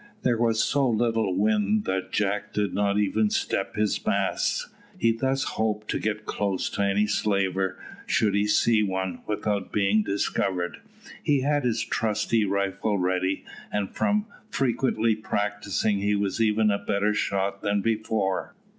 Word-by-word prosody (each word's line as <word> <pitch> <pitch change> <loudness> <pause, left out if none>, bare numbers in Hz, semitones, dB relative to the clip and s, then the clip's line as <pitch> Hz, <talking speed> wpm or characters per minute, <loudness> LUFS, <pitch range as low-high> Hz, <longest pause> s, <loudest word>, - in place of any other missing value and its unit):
There 120 -3 +2
was 115 -1 +3
so 140 -3 +2
little 115 -4 +1
wind 105 0 +2
that 95 0 -2
Jack 105 0 -1
did 105 -2 0
not 100 +1 +1
even 105 +1 +2
step 100 -1 -1
his 105 -1 0
masts. - - 0 0.3
He 115 - +3
thus 130 +4 0
hoped 110 -4 -2
to - - -1
get 105 0 -2
close 100 -3 -1
to - - -2
any 100 +1 +2
slaver, 95 -2 0 0.3
should 105 -2 +2
he 100 +1 +2
see 110 +1 +3
one, 95 -2 -2
without 105 -2 -2
being 105 +1 +3
discovered. 95 -3 -1 0.4
He 145 -4 +2
had 145 0 +1
his 115 -2 +1
trusty 110 0 0
rifle 100 +1 0
ready, 95 +1 0 0.3
and 100 -2 -1
from 210 0 +1 0.2
frequently 120 - +1
practising 105 -1 -1
he 105 +1 +1
was 100 +2 -1
even 110 -1 +3
a 100 - 0
better 105 +1 0
shot 100 -1 -1
than 100 0 +1
before. 110 -3 -1
105 Hz, 150 wpm, -26 LUFS, 100-110 Hz, 0.4 s, was